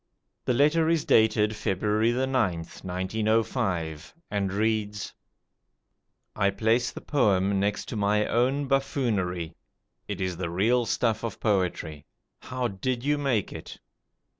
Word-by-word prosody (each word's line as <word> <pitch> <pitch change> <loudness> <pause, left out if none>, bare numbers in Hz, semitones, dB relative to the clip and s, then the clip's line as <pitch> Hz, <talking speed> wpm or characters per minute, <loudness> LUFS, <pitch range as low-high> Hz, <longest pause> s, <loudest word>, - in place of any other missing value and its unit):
The 125 - +1
letter 155 +4 +3
is 165 -2 +1
dated 110 -1 +3
February 105 +3 +1
9th, 120 -10 -1
1905, 95 -4 -1 0.2
and 100 -2 0
reads: 105 0 -1 1.2
"I 100 -2 +2
place 110 +5 +1
the - - -9
poem 100 -8 +2
next 100 +1 0
to - - -4
my 105 0 +2
own 135 +4 +1
buffoonery. 105 - 0 0.5
It - - -4
is 95 -2 -2
the 90 -1 -3
real 115 +7 +2
stuff 115 0 0
of 115 -3 -4
poetry. 85 -7 -1 0.3
How 125 -1 -3
did 120 +4 -3
you 145 +1 +1
make 130 -8 0
it? - - -9
105 Hz, 125 wpm, -27 LUFS, 95-125 Hz, 1.2 s, letter